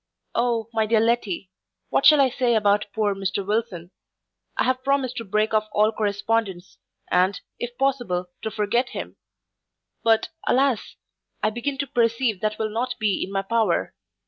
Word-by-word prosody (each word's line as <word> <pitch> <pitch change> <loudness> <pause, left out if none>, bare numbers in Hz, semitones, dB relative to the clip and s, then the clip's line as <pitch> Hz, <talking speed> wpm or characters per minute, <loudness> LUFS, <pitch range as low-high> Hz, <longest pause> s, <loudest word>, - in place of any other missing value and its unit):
O, 235 -2 0
my 220 -1 +1
dear 225 0 +3
Letty! 215 -5 0 0.4
what - - +4
shall 300 -1 +8
I 265 -2 +4
say 245 -1 +1
about 210 -1 +2
poor 210 -1 +1
Mr 195 0 -2
Wilson? 205 -5 -2 0.7
I - - +3
have 255 0 0
promised 270 -2 0
to 230 - -3
break 215 +1 0
off 215 0 +2
all 215 +1 +4
correspondence, 205 -3 -2 0.3
and, 185 +2 +3 0.2
if 245 0 -5
possible, 240 -10 -1
to 220 - -2
forget 220 +4 0
him: - - -6 0.9
but, 225 -1 +3 0.2
alas! 265 -3 +1 0.5
I 215 - +2
begin 240 +5 -3
to 280 - -1
perceive 230 -4 +1
that 215 0 -1
will 215 -1 -2
not 245 +3 -2
be 210 -4 +1
in 190 - -6
my 195 0 -1
power. 220 -3 +1
220 Hz, 165 wpm, -24 LUFS, 205-240 Hz, 0.9 s, shall